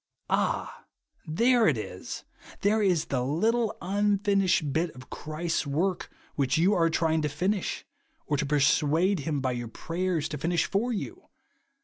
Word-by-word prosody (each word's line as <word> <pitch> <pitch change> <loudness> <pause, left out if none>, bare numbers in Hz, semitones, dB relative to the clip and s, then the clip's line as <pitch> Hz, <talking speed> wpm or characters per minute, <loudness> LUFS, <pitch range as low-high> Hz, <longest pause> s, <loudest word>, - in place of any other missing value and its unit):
Ah, - - -1 0.4
there 235 +9 +3
it 145 -7 +3
is! 95 -4 -6 0.4
Thei 215 +2 +3
e 205 - +3
is 175 -5 +2
the 125 -3 -1
little 220 - +1
unfinished 200 -1 +2
hit 165 +2 +1
of 130 0 -13
Christ's 155 0 -3
work 170 +6 -1 0.2
which 140 +1 +1
you 180 +6 +4
are 165 -4 +3
trying 160 -1 +1
to 150 - 0
finish, 185 +7 -2 0.4
or 150 - 0
to 150 - 0
persuade 150 +6 +3
him 145 -1 -2
by 130 -1 0
your 120 -1 -4
prayers, 170 +4 -2
to 150 - -5
finish 170 +1 +1
for 230 +6 0
you 345 - -5
170 Hz, 155 wpm, -28 LUFS, 150-200 Hz, 0.4 s, you